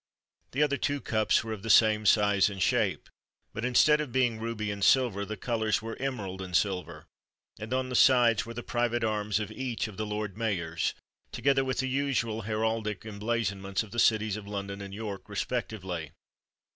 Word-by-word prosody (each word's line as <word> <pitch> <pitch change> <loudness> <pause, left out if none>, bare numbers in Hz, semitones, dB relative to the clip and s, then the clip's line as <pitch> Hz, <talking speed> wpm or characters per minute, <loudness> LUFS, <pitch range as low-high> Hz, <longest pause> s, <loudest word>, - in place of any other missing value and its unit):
The 140 +4 +3
other 140 -1 +1
two 145 +3 -1
cups 110 -4 +1
were 110 -1 -4
of 105 - -7
the 115 - -6
same 110 0 +5
size 105 -2 +4
and 100 -1 -7
shape, 90 - +1 0.5
but, 110 - -5
instead 150 +5 +4
of 145 -5 -5
being 120 -3 +1
ruby 110 -2 -3
and 100 -1 -4
silver, 115 -6 +3
the 110 +1 -6
colours 110 -1 0
were 115 0 -5
emerald 105 -9 -4
and 90 -2 +1
silver; 85 -6 -2 0.5
and 105 +2 -7
on 130 0 0
the 125 - -3
sides 120 -4 +5
were 115 0 -9
the 120 - -5
private 120 0 0
arms 105 -1 0
of 105 - -4
each 125 -4 -3
of 105 - -11
the 110 - -2
Lord 105 -2 -3
Mayors, 85 -7 -1 0.4
together 135 0 +2
with 130 -1 -2
the 130 - -2
usual 130 -5 -1
heraldic 110 -1 -2
emblazonments 100 -2 -2
of 105 - -13
the 120 - -3
cities 110 -2 +3
of 105 -2 -9
London 100 -1 -5
and 100 -1 -7
York 105 -1 -6
respectively. 95 - -3
110 Hz, 185 wpm, -29 LUFS, 100-120 Hz, 0.5 s, same